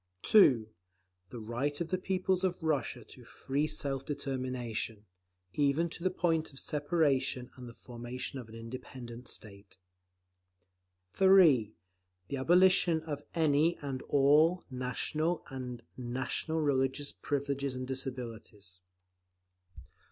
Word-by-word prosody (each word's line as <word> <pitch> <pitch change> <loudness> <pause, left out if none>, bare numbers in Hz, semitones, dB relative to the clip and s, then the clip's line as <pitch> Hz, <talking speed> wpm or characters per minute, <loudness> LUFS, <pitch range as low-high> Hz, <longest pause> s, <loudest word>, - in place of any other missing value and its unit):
(2) 130 - +6 0.6
The 120 - -8
right 120 +7 -2
of 170 -1 -3
the 185 - +1
peoples 185 0 0
of 180 -2 -1
Russia 150 -6 -1
to - - -14
free 145 +3 -2
self 140 -3 -2
determination, 130 -6 -4 0.5
even 145 +4 +2
to 170 - -6
the 185 - +3
point 165 -4 0
of 135 - -15
separation 145 -4 0
and 125 -2 -9
the - - -11
formation 125 +2 -6
of 120 -3 -10
an 110 - -11
independent 120 +1 -8
state. 100 -3 -8 1.3
(3) 165 - +5 0.5
The 140 - -2
abolition 175 +2 +4
of 145 -3 -4
any 160 +1 +3
and 135 -3 -5
all 150 +6 +4
national 150 +6 -2
and 125 -2 -6
national 130 +6 -2
religious 140 0 0
privileges 140 -2 -2
and 130 0 -4
disabilities. 115 -8 -5
135 Hz, 115 wpm, -32 LUFS, 125-160 Hz, 1.3 s, 2